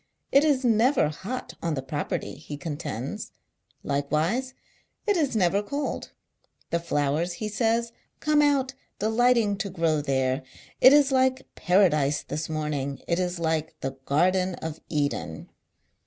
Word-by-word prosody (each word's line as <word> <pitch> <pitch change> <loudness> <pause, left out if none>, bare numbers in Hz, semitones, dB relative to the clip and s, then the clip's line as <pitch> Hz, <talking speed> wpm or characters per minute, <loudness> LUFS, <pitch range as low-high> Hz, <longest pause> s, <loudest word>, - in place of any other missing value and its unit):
It 275 - +6
is 280 -4 +2
never 230 - +3
hot 210 +11 -6
on. 165 -2 -1
the 135 - -4
Property, 145 +2 -3
he 145 - -8
contends. 145 -6 -5 0.5
Likewise 155 - -1 0.5
it 415 - +2
is 290 -8 +1
never 195 0 +3
cold. 280 +8 -4 0.6
The 170 - +1
flowers, 160 +1 0
he 215 +5 -4
says, 230 +2 0 0.3
come 305 -1 +3
out, 275 -2 +2 0.2
delighting 220 -1 +2
to 200 - -3
grow 165 -4 +1
there; 130 -1 0 0.4
it 260 - +9
is 285 -1 +5
like 260 0 +2
Paradise 155 -6 +2
this 155 +1 -4
morning; 150 -3 -2
it 170 +1 +1
is 180 -1 -1
like 160 -1 -2
the 135 - -2
Garden 180 +5 +2
of 160 -1 -6
Eden. 145 - -2
175 Hz, 140 wpm, -26 LUFS, 150-245 Hz, 0.6 s, it